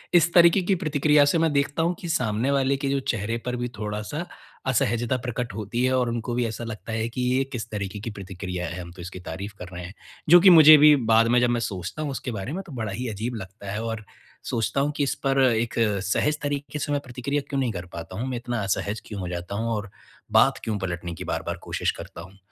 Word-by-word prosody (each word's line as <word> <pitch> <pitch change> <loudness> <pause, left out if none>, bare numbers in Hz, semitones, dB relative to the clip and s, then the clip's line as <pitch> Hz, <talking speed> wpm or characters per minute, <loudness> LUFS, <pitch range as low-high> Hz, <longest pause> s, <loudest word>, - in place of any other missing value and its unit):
इस 170 0 +5
तरीके 170 +2 +6
की 190 +2 +1
प्रतिक्रिया 150 -3 +3
से 145 - +2
मैं 165 -1 +2
देखता 140 +3 +1
हूँ 170 +2 +1
कि 175 - -6
सामने 115 -5 0
वाले 140 0 +2
के 140 0 -3
जो 140 0 +1
चेहरे 115 -3 -2
पर 125 0 -1
भी 120 0 -2
थोड़ा-सा 105 +10 -4 0.4
असहजता 120 0 +1
प्रकट 125 -1 -4
होती 110 +3 -2
है 130 0 +2
और 125 -2 +1
उनको 115 +1 -3
भी 125 0 +1
ऐसा 115 +1 -5
लगता 110 -2 -7
है 110 0 -1
कि 120 +2 -4
ये 135 - +3
किस 120 -1 -4
तरीके 105 -1 -4
की 110 - -5
प्रतिक्रिया 90 -3 -5
है 90 +2 -5
हम 85 -1 -9
तो 90 - -11
इसकी 90 +1 -7
तारीफ़ 95 +4 -6
कर 90 - -7
रहे 90 0 -6
हैं, 90 - -9 0.4
जो 175 +2 +10
कि 190 - +8
मुझे 155 -3 +10
भी 150 0 +8 0.2
बाद 115 +1 +6
में 120 +1 +4
जब 120 - +3
मैं 120 0 +1
सोचता 100 - -4
हूँ 150 -2 -2
उसके 130 -1 -4
बारे 110 +5 -4
में 190 - -3
तो - - -10
बड़ा 110 -4 -3
ही 125 +6 -4
अजीब 110 +3 -4
लगता 95 0 -8
है 105 +3 -3
और 115 -1 -4 0.5
सोचता 120 +3 0
हूँ 145 +1 +1
कि 145 - +2
इस 140 - 0
पर 135 0 +3
एक 120 -2 +1 0.3
सहज 150 +10 +1
तरीके 145 0 -3
से 145 - -2
मैं 145 -1 +1
प्रतिक्रिया 135 +3 -2
क्यों 140 - -1
नहीं 125 -3 0
कर 90 -1 -5
पाता 85 +2 -7
हूँ? 125 +4 -2
मैं 125 - -2
इतना 120 -1 -3
असहज 100 +2 -2
क्यों 100 -2 -6
हो 90 - -4
जाता 90 +2 -5
हूँ 115 +2 -1
और 100 -1 -4 0.4
बात - - +4
क्यों 110 -2 -1
पलटने 90 -2 -4
की - - -7
बार-बार - - -3
कोशिश - - -1
करता - - -9
हूँ? 95 +3 -13
120 Hz, 250 wpm, -25 LUFS, 100-140 Hz, 0.5 s, जो